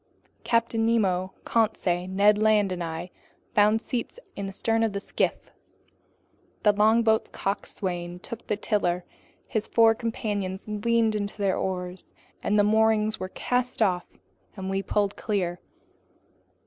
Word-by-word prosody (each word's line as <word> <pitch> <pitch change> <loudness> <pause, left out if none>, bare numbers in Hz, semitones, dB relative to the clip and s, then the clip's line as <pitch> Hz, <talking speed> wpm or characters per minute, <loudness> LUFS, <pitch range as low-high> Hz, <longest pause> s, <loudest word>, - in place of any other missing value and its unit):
Captain 230 -1 +1
Nemo, 190 -5 +1
Conseil, 185 -6 +1
Ned 205 +2 +4
Land, 210 -2 +3
and 180 -1 -3
I 165 +2 -5 0.4
found 210 +2 +4
seats 245 - -4 0.2
in 200 -1 -4
the - - -5
stern 225 +3 0
of 225 -2 +1
the 200 - -2
skiff. - - -2 1.1
The 210 - +5
longboat's 220 +1 +3
coxswain 175 -3 -3
took 225 +5 -9
the 210 - 0
tiller; 180 -5 0 0.4
his 220 -1 -2
four 225 -1 +5
companions 210 -5 -3
leaned 220 +1 +1
into 205 -1 -3
their 195 -2 +1
oars; 180 -1 -4 0.3
the 205 0 +3
moorings 220 0 +3
were 185 - -4
cast 250 +4 -1
off 180 -5 +1 0.5
and 190 0 -4
we 195 0 0
pulled 205 0 0
clear. 180 -5 -1
205 Hz, 135 wpm, -26 LUFS, 190-220 Hz, 1.1 s, The